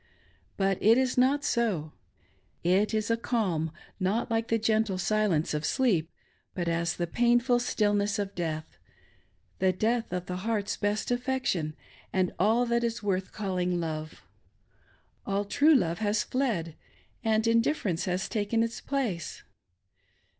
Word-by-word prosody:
But 195 -1 +1
it 225 +3 +6
is 260 -1 +1
not 270 +3 +3
so. 195 -11 0 0.7
It 190 +5 +3
is 220 0 0
a 230 - +2
calm 190 -10 0 0.3
not 205 +6 0
like 225 0 0
the 230 - +2
gentle 220 -3 +1
silence 185 -5 +1
of 150 0 -2
sleep, 185 - +1 0.5
but 175 -2 -2
as 170 0 0
the 175 - -1
painful 240 +5 +3
stillness 205 -3 +1
of 200 -1 -3
death 160 - -4 0.4
— - - -40
the 190 0 +3
death 225 +4 0
of 180 0 -3
the 180 0 -4
heart's 210 +1 -1
best 205 +3 -1
affection 245 - -1 0.4
and 185 -1 +1
all 225 +6 +3
that 235 0 +1
is 230 -2 -2
worth 190 -2 -1
calling 180 -3 -1
love. 155 -2 -5 1.0
All 200 +1 0
true 290 +9 +4
love 170 -9 +1
has 210 -1 +1
fled, 210 - -1 0.5
and 220 -1 +2
indifference 230 - +1
has 185 +1 -1
taken 225 +1 0
its 230 0 -4
place. 235 - -3
205 Hz, 145 wpm, -28 LUFS, 180-230 Hz, 1.0 s, it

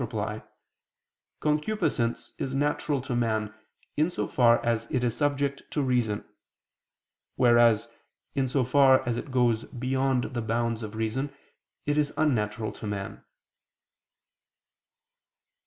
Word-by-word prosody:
3, 110 -2 -4
ad 105 - -1
1), - - -11 1.0
concupiscence 150 - 0
is 135 0 -2
natural 145 0 0
to 130 -1 -3
man, 110 -3 0 0.4
in 155 +3 +2
so - - -3
far 120 -2 +4
as 115 -1 0
it 125 - 0
is 120 -2 0
subject 140 -1 0
to 145 - -1
reason: 120 -5 0 1.1
whereas, 120 -3 +5 0.5
in 135 -1 +1
so 130 +1 +1
far 130 0 +5
as 120 - +1
it - - -4
is - - -14
goes 120 -3 +2
beyond 130 0 -1
the 120 - -1
bounds 115 0 -1
of 110 -1 -6
reason, 115 +6 -2 0.5
it 145 +1 +1
is 145 -1 0
unnatural 110 -7 0
to 110 - -8
man. 100 -1 -5
125 Hz, 135 wpm, -27 LUFS, 115-140 Hz, 1.1 s, whereas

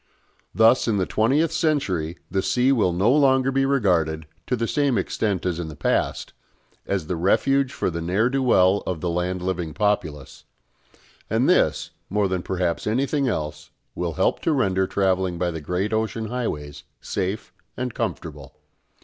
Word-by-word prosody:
Thus 115 +3 +5
in 110 -3 +1
the 95 - +1
twentieth 140 - +2
century 120 - 0
the 95 +1 +1
sea 125 +6 +2
will 110 -9 +2
no 95 +7 +2
longer 135 -2 +3
be 135 0 +1
regarded, 85 - +1 0.2
to 125 - +1
the 115 -1 -2
same 140 -3 +1
extent 100 0 -1
as 90 -2 -1
in 85 - -4
the 75 - -8
past, - - -1 0.5
as 95 -5 -1
the 90 - -2
refuge 135 +10 +2
for - - -2
the 85 0 -4
ne'er 95 +7 +1
do 135 +1 0
well 100 -6 +4
of 90 -3 -2
the 85 +2 -2
land 90 +1 -2
living 90 -4 -3
populace; 80 -9 -2 0.9
and - - +2
this, - - +2 0.2
more 105 0 +1
than 95 -1 -2
perhaps 90 -1 -2
anything 135 +5 +1
else, 75 -7 -3 0.2
will 85 -2 -3
help - - +1
to 165 - 0
render 95 -8 +1
travelling 95 -2 0
by 90 0 -1
the 80 -1 -6
great 90 +7 -2
ocean 110 0 -1
highways 75 - -4 0.2
safe 95 +2 -4 0.2
and 125 -2 -3
comfortable. 75 -4 -5
95 Hz, 165 wpm, -23 LUFS, 85-125 Hz, 0.9 s, Thus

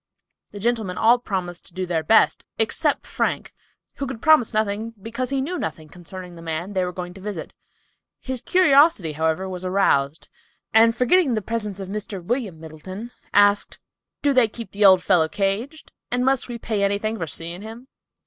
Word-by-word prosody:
The 205 - -9
gentlemen 220 -4 -1
all 235 +2 +5
promised 185 -6 -4
to - - -17
do 185 0 -2
their 170 -2 -1
best, 220 +8 +3
except 225 0 0
Frank, - - -2 0.4
who 275 - -3
could 250 -3 -6
promise 310 -4 +4
nothing, 215 +1 -1
because 230 +4 -4
he 275 -1 0
knew 355 +5 -3
nothing 155 -1 -5
concerning 180 +2 -10
the 170 - -12
man 165 +4 -4
they 185 -1 +1
were 180 - -2
going 180 0 -6
to 190 - -13
visit. 200 -4 -6 0.7
His 260 -2 -4
curiosity, 285 - +4
however, 160 +4 -1
was 185 -1 -6
aroused, 165 -6 +1 0.5
and 230 +1 +6
forgetting 255 +2 +3
the 215 - -1
presence 210 -2 -4
of 195 - -6
Mr. 205 -1 -5
William 200 -2 -3
Middleton, 185 +8 -9 1.1
"Do 285 -1 +3
they 255 -3 +5
keep 230 +1 -9
the 205 +1 -1
old 185 -2 +7
fellow 165 -4 +3
caged? 210 - -2 0.2
And 250 +1 +1
must 270 -1 +1
we 240 -1 -5
pay 220 -3 -2
anything 205 +2 0
for 165 - -3
seeing 170 +5 -4
him?" 225 +4 -10
205 Hz, 175 wpm, -23 LUFS, 180-235 Hz, 1.1 s, old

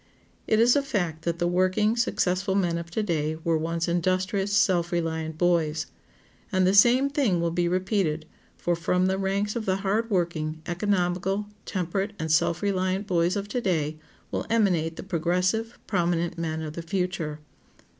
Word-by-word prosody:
It 220 - +3
is 240 +2 +5
a 285 - +4
fact 175 - -2
that 170 -1 0
the 175 - 0
working, 185 +5 +2
successful 190 -5 0
men 175 -4 +1
of 170 0 -8
to 215 +5 -1
day 160 -4 -1
were 165 -1 +2
once 165 +1 -1
industrious, 185 +3 0
self 180 -4 +2
reliant 160 -2 -2
boys. 165 -3 +1 0.7
And 185 -1 +3
the 185 - +3
same 245 +7 +6
thing 275 - +1
will 170 0 0
be 175 +1 +1
repeated, 180 -3 0 0.3
for 175 - 0
from 180 +2 +1
the 190 +1 +1
ranks 200 +2 -1
of 225 -3 -3
the 185 - +2
hard 220 +4 +1
working, 165 -5 -1
economical, 185 +1 0 0.2
temperate, 195 +3 -2
and 160 -2 -2
self 165 +3 +2
reliant 190 0 0
boys 175 -1 +1
of 200 0 -3
to 245 +4 -1
day 155 -6 -1 0.3
will - - -3
emanate 180 -8 +2
the - - -7
progressive, 185 +6 0
prominent 175 -3 0
men 160 -1 -3
of 155 -1 -5
the 170 - -5
future. 170 -3 -2
180 Hz, 170 wpm, -26 LUFS, 170-200 Hz, 0.7 s, same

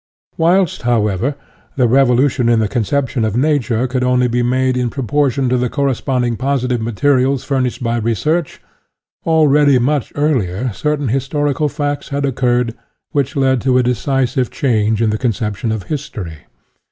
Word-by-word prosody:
Whilst, 175 +1 +2
however, 115 +2 0 0.4
the 125 -3 +3
revolution 125 0 +3
in 120 - +4
the 110 -1 +1
conception 125 +2 -1
of 110 0 -1
Nature 130 -4 +1
could 130 0 -2
only 125 0 +2
be 120 0 0
made 130 +1 +1
in 125 -1 0
proportion 135 +1 0
to 125 - +2
the 125 0 0
corresponding 130 -3 -1
positive 125 -3 -1
materials 130 +3 +1
furnished 130 -2 -2
by 115 0 0
research, 135 - -1 0.7
already 150 -3 +4
much 135 +2 0
earlier 125 - 0
certain 150 +1 -1
historical 145 +3 0
facts 145 -1 -3
had 140 0 -1
oc 135 - -1
curred 120 -2 0 0.4
which 140 -2 -1
led 130 -3 +2
to 130 -1 +2
a 130 - +3
decisive 125 +1 0
change 110 -6 0
in 110 - +2
the 105 - -2
conception 110 -2 -2
of 110 -3 -3
history. 90 - -6
130 Hz, 155 wpm, -17 LUFS, 120-140 Hz, 0.7 s, in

